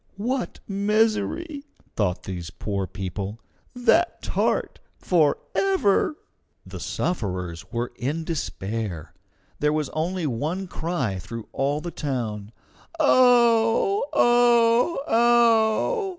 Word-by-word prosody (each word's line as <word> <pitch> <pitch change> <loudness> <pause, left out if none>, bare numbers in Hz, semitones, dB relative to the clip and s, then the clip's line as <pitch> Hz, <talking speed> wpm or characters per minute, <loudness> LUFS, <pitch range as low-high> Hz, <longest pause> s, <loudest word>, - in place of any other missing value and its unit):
"What 245 +5 -3
misery!" 215 +10 0 0.3
thought 95 -4 -1
these 90 -3 -6
poor 100 -1 -4
people. 95 +4 -5 0.4
"That 285 +8 +2
tart - - -1 0.2
forever!" 200 - +1 0.5
The - - -8
sufferers 90 - -3
were 120 0 -3
in 145 +7 -2
despair. 100 - -4 0.5
There 150 0 +2
was 150 -2 -1
only 170 +2 -2
one 155 +9 -2
cry 160 - -3
through 115 +5 -8
all 140 +2 0
the 175 +1 -5
town: 115 -9 -4 0.5
"Ow! 245 - +4
ow! 240 +4 +4
ow!" 235 - +3
170 Hz, 95 wpm, -24 LUFS, -, 0.5 s, Ow